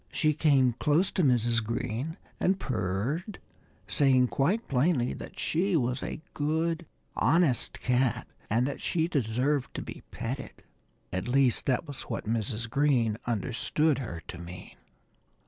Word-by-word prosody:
She 155 -1 +2
came 140 -4 +4
close 150 - +2
to 185 - +1
Mrs. 120 -3 +3
Green 115 - -3 0.2
and 190 +1 +2
purred, 125 - -2 0.5
saying 130 +2 +4
quite 195 +12 +1
plainly 130 -1 +2
that - - -9
she 180 +3 +1
was 125 -3 +1
a 155 - -5
good, 160 +2 0 0.3
honest 150 -3 +2
cat 125 -1 +1 0.2
and 115 +4 +2
that 140 - -4
she 165 -1 +1
deserved 135 -1 0
to - - -3
be - - -8
petted. 130 +4 -5 0.5
At 95 +4 -2
least, 130 -1 +3
that 130 +4 +1
was 140 -2 -7
what - - -3
Mrs. 115 +1 -2
Green 120 -5 +2
understood 125 +6 +1
her 85 -11 -6
to 90 - -7
mean. 90 +2 -9
130 Hz, 140 wpm, -29 LUFS, 115-155 Hz, 0.5 s, came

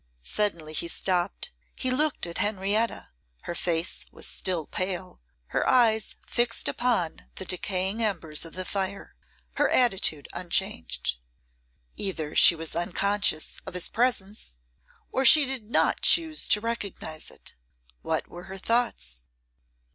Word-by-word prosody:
Suddenly 165 - -1
he 170 - -1
stopped; 185 - -1 0.3
he 255 - 0
looked 295 -1 0
at 170 -1 -5
Henrietta; 210 +2 0 0.3
her - - -5
face 170 0 0
was - - -5
still 180 -5 -1
pale, 185 - -4 0.3
her - - 0
eyes 225 -3 +3
fixed 240 0 0
upon 235 -10 -1
the 190 - -4
decaying 190 +3 -1
embers 170 -8 0
of 165 - -8
the 185 0 -4
fire, 195 0 -3 0.4
her - - +3
attitude 195 - +2
unchanged. 80 - -1 0.8
Either 160 -6 -3
she 170 - +8
was 160 -1 -3
unconscious 190 -1 0
of - - -7
his 180 - +2
presence, 215 - -1 0.5
or 265 - +1
she 290 +3 +9
did 255 -5 -5
not - - +2
choose 325 -3 +5
to 210 - +5
recognise 205 -8 -4
it. - - -10 0.5
What - - -2
were 175 +1 -11
her 190 0 -8
thoughts? 60 - -1
190 Hz, 130 wpm, -26 LUFS, 170-230 Hz, 0.8 s, she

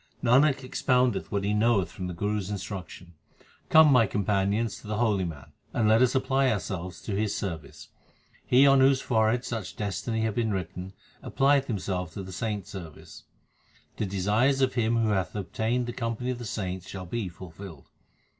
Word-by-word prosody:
Nanak 135 +3 +4
expoundeth 125 -2 +1
what 100 -1 -1
he 100 +1 0
knoweth 105 -5 +2
from 90 0 -6
the 90 - -5
Guru 105 +4 -1
s 95 -1 -6
instruction; 95 -3 -7 0.6
come, 155 -2 +7
my 120 -5 +5
companions, 100 +3 0
to - - -12
the 105 0 -2
holy 105 -5 +1
man, 75 -5 -8 0.2
and 110 -3 +2
let 110 +2 +5
us 130 0 +3
apply 130 0 +2
ourselves 90 -4 -4
to 105 - -3
his 105 0 -1
service. 80 -7 -6 0.5
He 130 +3 +5
on 135 -1 +6
whose 135 0 +5
forehead 115 0 +1
such 105 -8 -5
destiny 110 +2 -2
hath 110 -1 0
been 115 0 0
written 95 -1 -4 0.3
applieth 140 0 +2
himself 90 -6 -3
to 100 - -5
the 95 - -9
saints 105 +2 -4
service. 85 -6 -10 0.7
The 105 - -1
desires 105 +8 +1
of 130 -1 +2
him 115 -1 +1
who 115 -1 +2
hath 95 -2 -1
obtained 110 +5 -1
the 120 - -5
company 115 +1 -3
of 125 - -5
the 120 - -6
saints 95 -4 -4
shall 95 -2 -6
be 100 +1 -3
fulfilled. 85 -3 -11
105 Hz, 180 wpm, -27 LUFS, 95-120 Hz, 0.7 s, come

